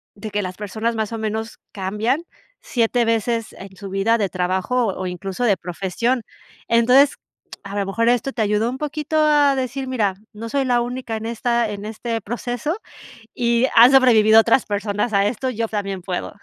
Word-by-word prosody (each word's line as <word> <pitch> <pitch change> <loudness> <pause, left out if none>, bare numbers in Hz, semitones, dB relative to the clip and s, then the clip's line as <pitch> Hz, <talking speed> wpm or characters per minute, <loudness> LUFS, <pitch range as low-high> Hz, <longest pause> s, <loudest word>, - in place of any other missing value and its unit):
de 210 +2 -7
que 205 - 0
las 185 0 -6
personas 220 +3 -2
más 220 0 -2
o - - -3
menos 220 +1 -4 0.2
cambian 210 - -1 0.4
7 235 0 +1
veces 230 0 -1
en 190 0 -11
su 200 - -8
vida 195 +4 +2
de 200 - +1
trabajo 185 +7 0
o 190 -1 -3
incluso 185 +5 -4
de 205 -4 +4
profesión. 195 +8 -2 0.4
Entonces, 250 +5 +5 0.5
a 200 -1 -7
lo 200 - 0
mejor 230 +4 +1
esto 245 +2 0
te 230 - -2
ayudó 210 +2 +1
un 255 - -5
poquito 300 +1 -3
a 295 -2 +4
decir: 265 +1 -3
"Mira, 210 -7 0 0.2
no 225 +2 -7
soy 275 +1 0
la 245 -1 +2
única 245 -2 -4
en 220 - -7
esta 235 0 0
en 205 0 -6
este 225 +1 -4
proceso 245 - -3 0.6
y 235 +1 +2
han 235 +3 +8
sobrevivido 225 -5 +6
otras 230 +2 +2
personas 205 +2 -2
a 200 0 +3
esto, 255 +4 -2
yo 230 -1 -2
también 200 -3 -3
puedo". 180 0 -4
225 Hz, 185 wpm, -21 LUFS, 205-245 Hz, 0.6 s, han